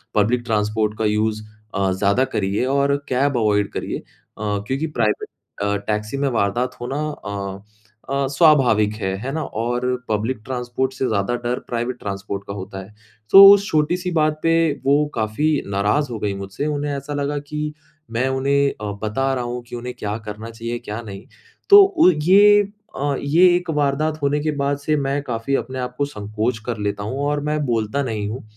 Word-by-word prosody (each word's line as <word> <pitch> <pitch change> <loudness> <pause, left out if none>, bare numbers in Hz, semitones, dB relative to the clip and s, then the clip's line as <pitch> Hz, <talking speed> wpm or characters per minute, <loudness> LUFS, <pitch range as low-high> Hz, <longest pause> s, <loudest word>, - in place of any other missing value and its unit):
Public 115 +4 +2
transport 105 -1 0
का 110 - -1
use 110 +1 0 0.3
अ, 95 -1 +1
ज़्यादा 100 +6 +2
करिए 100 +4 0
और 140 0 +2
कैब 135 +1 +1
अवॉइड 105 -2 +1
करिए।" - - -3
अ, - - -17 0.6
क्योंकि 135 +5 -1
प्राइवेट 115 -7 -1 0.3
अ, 100 0 +1
टैक्सी 105 +4 -2
में 140 -1 +1
वारदात 120 +2 0
होना 135 +4 -3 0.3
अ, 100 -1 -5 0.5
अ, 140 0 0
स्वाभाविक 135 -8 +4
है, 95 -1 -1
है 130 +6 -5
ना? 160 +1 -2
और 120 +3 -2 0.2
पब्लिक 110 +4 -1
ट्रांसपोर्ट 130 +1 -2
से 130 - -2
ज़्यादा 110 +2 0
डर 120 +1 -1
प्राइवेट 120 +1 -3
ट्रांसपोर्ट 100 0 -5
का 100 - -4
होता 95 -1 -7
है। 105 +3 -16 0.4
सो 195 +1 +11
उस 200 0 +2
छोटी-सी 175 +4 0
बात 155 -2 +1
पे 165 - +3 0.3
वो 145 +2 +4
काफ़ी 110 +7 0 0.2
नाराज़ 105 +8 +1
हो 115 - -4
गई 105 -1 -1
मुझसे, 100 +7 -5
उन्हें 145 -1 -2
ऐसा 140 +2 -6
लगा 145 0 -1
कि 150 +1 -5 0.4
मैं 120 +3 0
उन्हें 140 +1 +2
अ, 105 -1 -3
बता 135 +5 0
रहा 125 -2 -2
हूँ 120 0 -4
कि - - -7
उन्हें 125 +1 -5
क्या 105 +1 -3
करना 105 +2 -6
चाहिए 115 +1 -5
क्या 115 -1 -6
नहीं। 100 -4 -9 0.4
तो 405 -1 +10
उ 370 - +4
ये 205 +3 +7 0.3
अ, 140 0 -1
ये 160 +6 +4
एक 180 -1 -2
वारदात 150 +2 0
होने 145 +1 +1
के 155 +1 -1
बाद 140 0 0
से 145 +2 0
मैं 140 +1 -1
काफ़ी 120 +1 -2
अपने 130 -1 -3
आपको 125 +3 -2
संकोच 110 -1 -3
कर 120 -2 -3
लेता 100 0 -3
हूँ 130 +6 -3
और 145 0 0
मैं 150 0 -1
बोलता 120 +3 0
नहीं 110 -4 -3
हूँ। 120 +2 -6
125 Hz, 185 wpm, -21 LUFS, 105-145 Hz, 0.6 s, सो